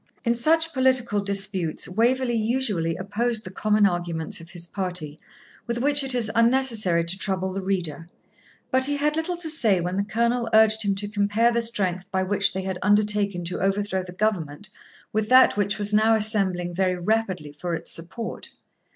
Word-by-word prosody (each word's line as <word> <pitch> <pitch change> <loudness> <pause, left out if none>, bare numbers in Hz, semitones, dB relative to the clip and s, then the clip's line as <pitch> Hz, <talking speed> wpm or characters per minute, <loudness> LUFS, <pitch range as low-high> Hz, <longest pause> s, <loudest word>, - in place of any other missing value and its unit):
In 235 - +3
such 325 +7 +2
political 260 -5 +2
disputes 195 -4 -2
Waverley 240 +6 +1
usually 215 -8 0
opposed 220 +4 -1
the 185 - -8
common 210 +1 +2
arguments 175 -4 -2
of 165 - -13
his 175 -1 -6
party, 180 -5 -5 0.5
with 235 0 -2
which 285 +3 +2
it 265 -1 0
is 225 -3 0
unnecessary 230 -7 +3
to 175 +3 -2
trouble 190 -1 -2
the 195 - -3
reader. 175 -4 -3 0.6
But 260 0 +3
he 290 +1 0
had 300 +1 0
little 320 +2 -2
to 340 -2 -3
say 230 - +2
when 180 +2 -3
the 200 - +1
Colonel 235 +3 0
urged 220 0 +5
him 200 -1 0
to 205 +1 -3
compare 210 +3 +1
the 235 0 0
strength 195 -5 -1
by 190 0 0
which 200 +1 +1
they 190 0 -4
had 190 -1 -4
undertaken 205 -2 +1
to 175 +1 -3
overthrow 195 0 0
the 180 -1 -9
government 180 -4 -2 0.4
with 215 0 -1
that 255 +1 +6
which 205 0 0
was 205 0 -1
now 220 +1 +4
assembling 195 -5 +1
very 185 0 0
rapidly 185 -5 -1
for 170 +4 -4
its - - -5
support. 185 +8 -6
205 Hz, 180 wpm, -24 LUFS, 185-235 Hz, 0.6 s, that